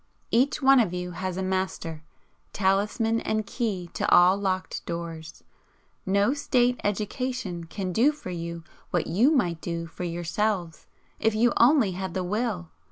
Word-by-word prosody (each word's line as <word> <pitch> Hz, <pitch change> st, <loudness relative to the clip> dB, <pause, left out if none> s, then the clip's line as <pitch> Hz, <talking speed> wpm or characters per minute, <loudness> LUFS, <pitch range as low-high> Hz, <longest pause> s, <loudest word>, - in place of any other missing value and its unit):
Each 270 Hz, +4 st, +2 dB
one 270 Hz, 0 st, +7 dB
of 190 Hz, -7 st, +1 dB
you 180 Hz, 0 st, -4 dB
has 185 Hz, +1 st, -4 dB
a 190 Hz, -, -1 dB
master 185 Hz, -4 st, -3 dB, 0.5 s
talisman 210 Hz, +4 st, +1 dB
and 215 Hz, 0 st, -1 dB
key 200 Hz, -6 st, -3 dB
to -, -, -1 dB
all 180 Hz, +2 st, +7 dB
locked 190 Hz, -2 st, -2 dB
doors. 170 Hz, -2 st, -6 dB, 0.6 s
No 200 Hz, +6 st, +3 dB
State 250 Hz, -4 st, +1 dB
education 205 Hz, -3 st, -2 dB
can 185 Hz, +2 st, -4 dB
do 250 Hz, +9 st, +4 dB
for 295 Hz, -11 st, -8 dB
you 170 Hz, -1 st, -5 dB, 0.3 s
what 175 Hz, -, 0 dB
you 225 Hz, -, +3 dB
might 175 Hz, -, +1 dB
do 170 Hz, -1 st, -3 dB
for 165 Hz, +2 st, -8 dB
yourselves, 175 Hz, 0 st, -2 dB, 0.3 s
if 225 Hz, -1 st, +1 dB
you 235 Hz, +2 st, +3 dB
only 245 Hz, -4 st, +5 dB
had 185 Hz, -1 st, -5 dB
the 185 Hz, -, -1 dB
WILL. 200 Hz, -3 st, -2 dB
190 Hz, 155 wpm, -26 LUFS, 175-225 Hz, 0.6 s, one